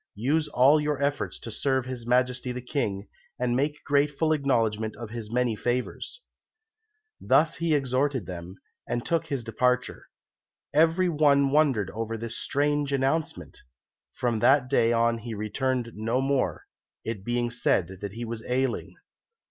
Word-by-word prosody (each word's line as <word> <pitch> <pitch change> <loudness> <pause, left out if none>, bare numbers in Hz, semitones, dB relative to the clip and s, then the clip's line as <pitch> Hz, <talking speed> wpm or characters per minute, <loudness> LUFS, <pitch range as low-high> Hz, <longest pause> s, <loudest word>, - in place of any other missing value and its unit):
Use 145 +9 +1
all 140 +5 +5
your 150 -2 -1
efforts 140 0 -1
to 115 - -8
serve 130 +3 0
His 125 -2 -6
Majesty 125 +1 +1
the 125 - -4
King, 115 -6 -3 0.3
and 125 -1 0
make 145 +3 -1
grateful 145 +2 +2
acknowledgment 115 -7 0
of 110 -1 -8
his 115 -2 -6
many 120 -2 +1
favours." 125 - -3 1.0
Thus 160 +1 +3
he 165 -2 +1
exhorted 135 -3 0
them, 90 +1 -7 0.3
and 120 - -2
took 165 -1 0
his 140 -5 -2
departure. 125 +3 0 0.7
Every 165 +4 +4
one 145 -4 +3
wondered 135 - +2
over 115 0 -4
this 115 +1 -4
strange 145 0 0
announcement. 135 - -1 0.5
From 120 -3 -1
that 125 +3 +4
day 115 -4 +4
on 115 0 +2
he 115 0 -6
returned 120 +3 -1
no 115 +4 -1
more, 135 0 0 0.4
it 110 -4 -4
being 120 +1 -1
said 95 -5 0
that 100 -1 -5
he 120 +2 -5
was 115 -1 -6
ailing. 130 0 -1
125 Hz, 150 wpm, -27 LUFS, 115-140 Hz, 1.0 s, all